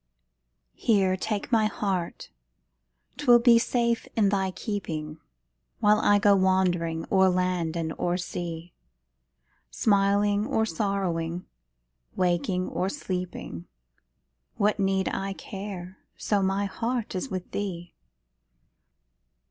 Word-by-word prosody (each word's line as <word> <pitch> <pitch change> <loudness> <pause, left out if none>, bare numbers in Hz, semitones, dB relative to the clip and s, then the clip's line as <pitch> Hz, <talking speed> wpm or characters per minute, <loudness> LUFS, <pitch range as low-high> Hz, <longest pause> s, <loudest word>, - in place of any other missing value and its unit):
Here, 195 -5 +2
take 210 +4 -3
my 220 -2 +4
heart 190 -5 -3 0.9
'twill 255 -4 +6
be 235 -1 +6
safe 235 -1 0
in 210 -3 +3
thy 195 -1 +1
keeping, 165 -7 -5 0.6
While 210 0 +4
I 205 -1 +4
go 205 -1 +5
wandering 180 -4 +1
o'er 190 -1 +5
land 180 -2 0
and 160 -1 -2
o'er 175 0 0
sea; 175 -1 -5 1.0
Smiling 205 - +2
or 220 - +1
sorrowing, 180 -3 -2 0.7
waking 180 0 0
or 185 - -1
sleeping, 180 - -5 0.9
What 210 +1 +1
need 195 -1 +1
I 195 0 -2
care, 190 -2 -8 0.2
so 205 -2 0
my 195 +1 +1
heart 230 +3 -3
is 185 - -3
with 185 -1 -5
thee? 175 -4 -4
190 Hz, 110 wpm, -27 LUFS, 175-205 Hz, 1.0 s, twill